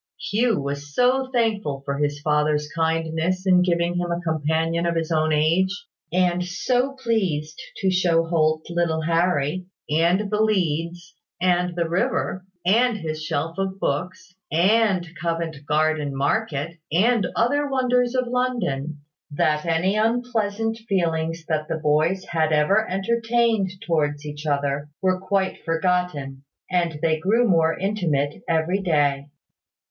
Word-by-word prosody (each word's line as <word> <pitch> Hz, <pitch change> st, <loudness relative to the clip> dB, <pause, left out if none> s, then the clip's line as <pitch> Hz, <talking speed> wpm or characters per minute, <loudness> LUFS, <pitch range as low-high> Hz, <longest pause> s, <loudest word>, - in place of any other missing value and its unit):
Hugh 225 Hz, -1 st, +1 dB
was 140 Hz, +1 st, -5 dB
so 260 Hz, +1 st, +2 dB
thankful 210 Hz, -, 0 dB
for 140 Hz, 0 st, -2 dB
his 145 Hz, 0 st, -1 dB
father's 150 Hz, -1 st, +1 dB
kindness 165 Hz, +3 st, -1 dB
in 180 Hz, -1 st, +5 dB
giving 175 Hz, -1 st, +1 dB
him 175 Hz, 0 st, -1 dB
a 170 Hz, -, -1 dB
companion 160 Hz, +1 st, 0 dB
of 170 Hz, -, 0 dB
his 165 Hz, 0 st, -2 dB
own 155 Hz, -1 st, +2 dB
age, 160 Hz, +5 st, +3 dB, 0.4 s
and 180 Hz, 0 st, +2 dB
so 245 Hz, +9 st, 0 dB
pleased 195 Hz, -, -2 dB, 0.2 s
to 190 Hz, -1 st, +2 dB
show 175 Hz, -3 st, +3 dB
Holt 155 Hz, -1 st, +1 dB
little 170 Hz, -2 st, 0 dB
Harry, 170 Hz, 0 st, 0 dB, 0.2 s
and 175 Hz, +6 st, +2 dB
the 210 Hz, 0 st, +1 dB
leads, 170 Hz, -4 st, -1 dB, 0.3 s
and 180 Hz, -1 st, +1 dB
the 170 Hz, -1 st, 0 dB
river, 180 Hz, +2 st, -1 dB, 0.2 s
and 230 Hz, +4 st, +3 dB
his 155 Hz, -4 st, -5 dB
shelf 165 Hz, +2 st, -3 dB
of 195 Hz, 0 st, -2 dB
books, 185 Hz, +5 st, -3 dB, 0.2 s
and 190 Hz, +1 st, +3 dB
Covent 165 Hz, -3 st, -3 dB
Garden 155 Hz, -2 st, +1 dB
Market, 160 Hz, 0 st, -1 dB
and 210 Hz, +4 st, +3 dB
other 285 Hz, +5 st, +1 dB
wonders 250 Hz, -2 st, +1 dB
of 255 Hz, 0 st, +1 dB
London, 230 Hz, -, -2 dB, 0.3 s
that 150 Hz, +2 st, 0 dB
any 170 Hz, +5 st, +1 dB
unpleasant 225 Hz, -1 st, 0 dB
feelings 165 Hz, -3 st, -1 dB
that 155 Hz, -2 st, -1 dB
the 160 Hz, -, -2 dB
boys 155 Hz, +5 st, +1 dB
had 160 Hz, -2 st, 0 dB
ever 185 Hz, +9 st, +2 dB
entertained 225 Hz, +1 st, +1 dB, 0.2 s
towards 150 Hz, -3 st, 0 dB
each 150 Hz, +1 st, -6 dB
other 145 Hz, 0 st, -1 dB
were 185 Hz, -1 st, +1 dB
quite 190 Hz, 0 st, -1 dB
forgotten, 165 Hz, -6 st, -1 dB, 0.3 s
and 170 Hz, -3 st, 0 dB
they 160 Hz, -1 st, +2 dB
grew 225 Hz, +8 st, +2 dB
more 165 Hz, -4 st, +3 dB
intimate 165 Hz, -8 st, -1 dB
every 165 Hz, +4 st, +1 dB
day. 145 Hz, -5 st, +1 dB
170 Hz, 135 wpm, -23 LUFS, 155-195 Hz, 0.4 s, in